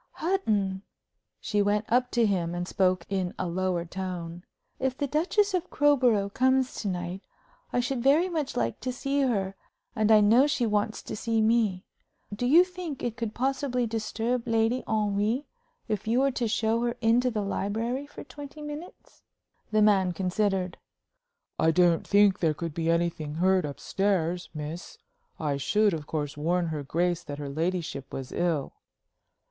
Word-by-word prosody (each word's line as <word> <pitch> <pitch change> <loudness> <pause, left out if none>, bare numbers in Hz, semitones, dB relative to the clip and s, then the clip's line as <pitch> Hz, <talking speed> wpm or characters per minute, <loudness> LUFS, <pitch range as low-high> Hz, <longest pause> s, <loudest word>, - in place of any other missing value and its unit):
"Hutton!" 210 - 0 0.6
She 210 -1 0
went 205 +1 +1
up 250 +1 +2
to 235 -2 +3
him 175 -4 0
and 175 0 -3
spoke 185 -3 +1
in 190 -2 -2
a 185 - -2
lower 180 0 -1
tone. 175 -1 -5 0.4
"If 260 -1 -1
the 285 - 0
Duchess 370 +8 +1
of 360 -1 -1
Crowborough 250 -9 +3
comes 260 +4 +2
to 210 - -3
night, 180 0 -3 0.5
I 245 - +1
should 250 0 -2
very 290 +8 +4
much 315 -6 -3
like 115 -1 -1
to 255 - -3
see 275 +3 -1
her, 200 -8 0 0.4
and 220 -1 +2
I 215 - +8
know 230 +7 +5
she 275 -4 0
wants 210 0 -1
to - - -6
see 225 +1 0
me. 220 -4 +2 0.5
Do 245 +4 -1
you 325 +7 +7
think 360 -6 -7
it 235 -2 -2
could 230 -2 -4
possibly 260 -1 0
disturb 230 +2 -2
Lady 230 +2 +1
Henry 215 +5 0 0.4
if 215 -1 -3
you 240 +4 +3
were 275 0 +3
to 245 -2 -1
show 225 +1 +1
her 240 0 -1
into 240 +2 +3
the 215 -3 -2
library 225 +7 -2
for - - -10
twenty 290 +1 -10
minutes?" 295 +4 -9 0.5
The 215 -1 +3
man 190 -4 +4
considered. 190 -1 -1 0.8
"I 160 - +4
don't 170 0 +3
think 205 -1 +4
there 160 -3 +1
could 165 0 -4
be 165 +1 -1
anything 165 -3 0
heard 185 0 +2
up 140 - -8
stairs, 180 -3 0
miss. 155 +3 -6 0.4
I 145 -3 -1
should, 210 +8 +2
of 155 -2 -5
course, 150 -2 -3
warn 170 +3 0
her 155 -2 -3
grace 170 +4 0
that 145 -2 -6
her 145 -1 -5
ladyship 160 -3 -3
was 135 -1 -6
ill." 165 -5 -1
210 Hz, 170 wpm, -27 LUFS, 175-245 Hz, 0.8 s, I